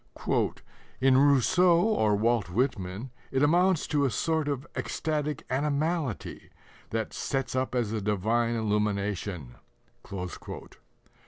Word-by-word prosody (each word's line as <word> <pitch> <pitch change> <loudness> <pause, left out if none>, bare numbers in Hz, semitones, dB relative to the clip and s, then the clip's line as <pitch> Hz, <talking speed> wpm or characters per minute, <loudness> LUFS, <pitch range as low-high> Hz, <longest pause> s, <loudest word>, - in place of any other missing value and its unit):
"In 130 0 +4
Rousseau 145 +6 +5
or 170 - +2
Walt 110 -3 +1
Whitman 110 0 -2 0.2
it 135 +1 +1
amounts 175 +3 +3
to 145 -2 +1
a 135 - +3
sort 160 +4 0
of 140 -2 -2
ecstatic 150 -2 -2
animality 145 - -2 0.4
that 110 -1 -3
sets 135 -2 -2
up 130 0 -1
as 120 -4 0
a 110 -1 -2
divine 110 +4 +1
illumination." 105 - -1
130 Hz, 105 wpm, -28 LUFS, 105-145 Hz, 0.4 s, Rousseau